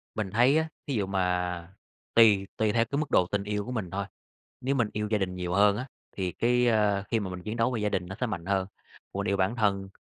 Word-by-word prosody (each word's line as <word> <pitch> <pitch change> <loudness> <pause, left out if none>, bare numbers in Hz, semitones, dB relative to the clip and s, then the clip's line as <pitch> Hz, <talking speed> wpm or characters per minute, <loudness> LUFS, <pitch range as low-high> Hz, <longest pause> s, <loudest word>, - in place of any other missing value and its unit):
Mình 105 -3 -2
thấy 125 +7 +4
á, 160 0 +1 0.2
thí 140 - -1
dụ 105 -4 0
mà 90 -2 -1 0.4
tùy 105 -4 +6
tùy 110 -1 +2
theo 115 +1 +2
cái 140 +5 -3
mức 155 - -3
độ 90 - +4
tình 100 +1 -1
yêu 105 0 -2
của 125 - -6
mình 110 -8 -3
thôi, 100 0 -2 0.6
nếu 135 +2 0
mình 120 -5 +1
yêu 105 0 -2
gia 105 - +2
đình 95 -2 -2
nhiều 90 -1 -3
hơn 100 0 +5
á 130 +4 -4 0.3
thì 95 -2 -2
cái, 125 +5 +2
à, 105 -3 +2
khi 115 - +2
mà 95 -3 -4
mình 90 0 -7
chiến 110 +4 -4
đấu 115 +2 +2
vì 120 -4 -2
gia 105 - +2
đình 90 -3 -2
nó 95 - -6
sẽ 125 - +1
mạnh 90 -7 -5
hơn, 95 -1 +1 0.5
còn 100 0 -3
yêu 100 - +2
bản 95 +5 0
thân 100 -3 +1
105 Hz, 265 wpm, -28 LUFS, 95-115 Hz, 0.6 s, tùy